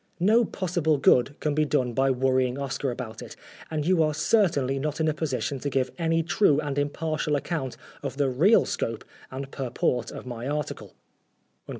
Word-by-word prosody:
No 220 +6 +4
possible 175 -6 0
good 135 +1 +3
can 150 - 0
be 155 +1 +2
done 130 -5 0
by 135 +2 +2
worrying 130 0 +1
Oscar 140 0 -2
about 120 -3 -6
it, - - -9 0.3
and 155 -2 -2
you 180 -1 +3
are 155 -1 +1
certainly 150 - +2
not 150 +2 -3
in 160 - +1
a 155 - +2
position 145 -3 -2
to 145 - -2
give 130 -2 0
any 165 0 +1
true 160 -3 +3
and 145 -2 -2
impartial 150 +1 -1
account 140 -3 -3 0.2
of 135 -1 -5
the 145 -1 +2
real 160 - +4
scope 115 -1 -3 0.3
and 135 +1 -6
purport 125 -2 -1
of - - -8
my 120 0 -5
article." 150 +1 -4
145 Hz, 180 wpm, -26 LUFS, 130-160 Hz, 0.3 s, No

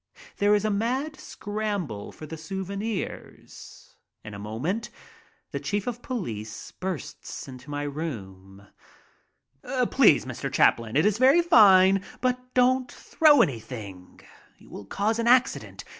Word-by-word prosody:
There 205 +1 +4
is 205 +1 0
a 215 - +1
mad 255 +9 -2
scramble 205 - -4
for 155 - -11
the 160 - -7
souvenirs. 195 +5 -7 0.3
In 110 - -9
a 100 - -8
moment 135 - -3 0.6
the - - -3
chief 205 -1 -2
of 245 -1 -4
police 115 - -6
bursts 185 -6 -6
into 130 +1 -11
my 145 0 -3
room. 100 - -7 1.3
"Please, - - +5
Mr. - - -5
Chaplin, 115 0 +2
it 150 - +3
is 210 +1 +2
very 275 +7 +5
fine, 195 - +6 0.2
but 250 0 0 0.2
don't 255 0 +3
throw 305 -2 +4
any 135 -10 -2
thing. 100 -6 -10 0.4
You - - -19
will 100 - -9
cause 210 - -1
an 230 - 0
accident. 250 +1 +2
190 Hz, 135 wpm, -26 LUFS, -, 1.3 s, fine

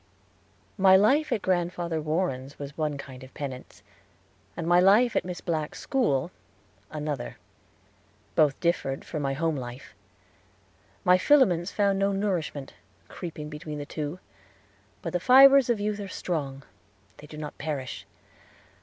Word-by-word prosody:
My 190 0 +7
life 270 +11 +3
at 210 - 0
Grandfather 175 -2 -1
Warren's 150 -4 -2
was 140 0 -8
one 150 -2 -2
kind 130 -1 -10
of 130 - -14
penance 130 -3 -7 0.7
and 170 - -3
my 175 +1 +5
life 210 +6 +5
in - - +3
Miss 180 -1 -6
Black's 155 -3 -3
school 180 - 0 0.6
another. 150 -5 -4 1.0
Both 150 -4 +3
differed 155 -6 -1
from 155 -3 -4
our 135 - -1
home 165 +1 0
life. 125 -2 -8 1.1
My 180 0 +5
filaments 195 - +3
found 200 -2 +1
no 195 0 +2
nourishment, 175 -8 -2 0.4
creeping 160 -4 -7
between 150 0 -7
the 145 - -5
two; 150 +3 -5 0.9
but - - -4
the 180 - +1
fibers 270 +4 +7
of 235 -3 +2
youth 210 0 -2
are 200 - -5
strong, 145 -7 -4
and 95 - -29 0.4
they 150 - -13
do 150 - -10
not 150 -1 -7
perish. 140 -5 -5
165 Hz, 145 wpm, -27 LUFS, 145-195 Hz, 1.1 s, My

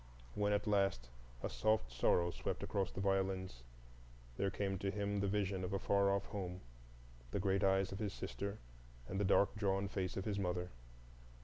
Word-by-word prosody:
When 105 0 +1
at 105 0 +1
last 95 - +2 0.3
a - - +1
soft 110 - +1
sorrow 85 +8 +3
crept - - -3
across 95 -2 0
the - - -7
violins, 95 -7 0 0.7
there 100 - +1
came 95 -1 -2
to 100 - -1
him 100 0 -1
the 100 - +1
vision 100 -2 0
of 90 +2 -3
a - - +2
far 100 0 +3
off 100 0 +1
home, 95 -3 -5 0.7
the 100 - -1
great 95 +1 +2
eyes 95 0 +3
of 95 - -5
his 105 -2 -1
sister, 100 +2 -4 0.5
and 95 - -2
the - - +2
dark 100 +2 +4
drawn 100 -1 +1
face 95 -2 -2
of 95 - -2
his 100 -2 -1
mother. 90 -1 -1
95 Hz, 185 wpm, -38 LUFS, 95-100 Hz, 0.7 s, dark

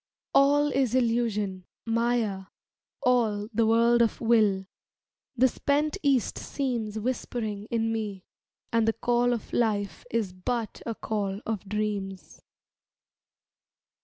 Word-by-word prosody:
"All 290 +1 +5
is 260 -3 +1
illusion, 225 -6 0 0.2
Maya, 230 -4 0 0.6
all 220 -4 +2
The 225 +1 +2
world 235 +1 +4
of 230 - +1
will," 215 -5 +3 0.7
the 260 +1 +5
spent 290 +4 0
East 275 -6 +1
seems 235 -6 -3
Whispering 220 -3 -3
in 225 -1 0
me; 205 -4 -4 0.5
"and 230 -1 +3
the 225 - +3
call 240 +2 +1
Of 235 -2 -4
Life 205 -6 0
is 220 -5 -1
but 225 +4 -3
a 230 - -2
call 200 -3 -2
of 210 -3 -4
dreams." 205 -2 -3
225 Hz, 115 wpm, -27 LUFS, 205-240 Hz, 0.7 s, All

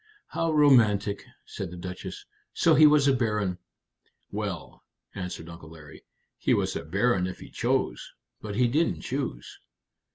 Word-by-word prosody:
"How 165 -1 -1
romantic!" 115 -9 +4 0.2
said 95 - -6
the 90 - -9
Duchess. 90 +1 -7 0.3
"So 165 - +4
he 155 +1 +8
was 150 -2 +4
a 140 - +5
baron!" 105 -7 -1 0.7
"Well," - - -5 0.3
answered 90 -3 -6
Uncle 85 -1 -11
Larry, 80 -2 -13 0.4
"he - - +2
was - - -1
a - - -3
baron 95 +3 +1
if 90 - -6
he - - -12
chose. - - -1 0.3
But 105 -2 -5
he 125 +2 +3
didn't 155 +8 +1
choose." 130 - -4
105 Hz, 150 wpm, -27 LUFS, 90-135 Hz, 0.7 s, he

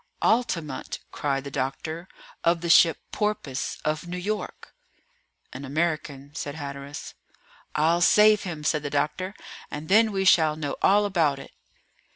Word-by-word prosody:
"Altamont!" 170 - 0
cried 135 -2 -1
the 140 - -7
doctor, 155 +6 -4 0.4
of 170 0 +2
the 170 -1 +1
ship 165 -2 +6
Porpoise, 210 -11 -2
of 155 +3 -1
New 180 +1 -4
York." 200 +2 -5 0.8
"An 130 - -7
American," 145 -1 -2
said 145 -1 -5
Hatteras. 140 -1 -7 0.6
"I'll 165 +3 +3
save 210 +3 +6
him," 160 -5 -6
said 150 0 +1
the 145 - -4
doctor, 155 +7 -1 0.3
"and 150 +2 -7
then 220 +3 +5
we 195 -1 -1
shall 160 -4 +5
know 150 -2 -3
all 205 +2 +4
about 165 -8 +1
it." 135 - -11
160 Hz, 145 wpm, -26 LUFS, 145-185 Hz, 0.8 s, ship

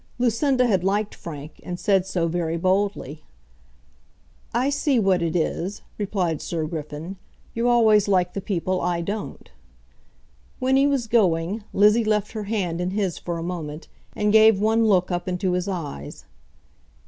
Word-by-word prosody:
Lucinda 250 +2 +2
had 190 -7 +1
liked 205 +2 0
Frank, 150 -2 -9
and 180 -1 -6
said 190 -2 +2
so 175 -3 0
very 165 -1 -1
boldly. 185 -5 -1 1.3
"I 255 +4 +1
see 285 -1 +1
what 195 -5 +2
it 165 0 -1
is," 180 +4 -2 0.2
replied 185 -6 -1
Sir 165 -2 -3
Griffin; 155 +3 -6 0.4
"you 235 +1 +1
always 220 -4 +4
like 180 -3 +2
the 195 - -4
people 185 -1 -1
I 175 -1 0
don't." 200 - -6 1.1
When 260 +1 +1
he 275 +1 +4
was 275 -4 0
going, 200 -2 +1
Lizzie 210 +3 +4
left 210 -1 0
her 215 -2 -5
hand 185 -5 -2
in 180 - -1
his 190 -3 -2
for 170 -1 -4
a 165 - -5
moment, 165 -3 -6 0.3
and 210 0 +1
gave 220 -2 +6
one 225 +2 +2
look 185 -4 +2
up 175 0 -2
into 185 +1 -1
his 180 +1 -1
eyes. 150 - -6
190 Hz, 160 wpm, -23 LUFS, 170-215 Hz, 1.3 s, gave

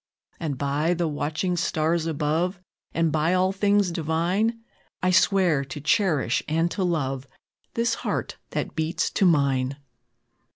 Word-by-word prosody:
And, 150 -5 -3
by 145 +5 0
the 170 -1 0
watching 155 +4 -1
stars 165 -1 0
above, 165 +4 0 0.3
And 165 -1 +1
by 160 +4 +2
all 185 +1 +3
things 200 -1 +2
divine, 175 +8 0 0.4
I 185 - +3
swear 185 -6 +3
to 135 +2 -7
cherish 150 - +2
and 165 +3 +1
to 195 - -1
love 135 -6 -1 0.5
This 230 0 +1
heart - - -3
that - - -3
beats 160 +1 -1
to 195 - +3
mine!" 140 -4 +2
165 Hz, 135 wpm, -25 LUFS, 150-185 Hz, 0.5 s, all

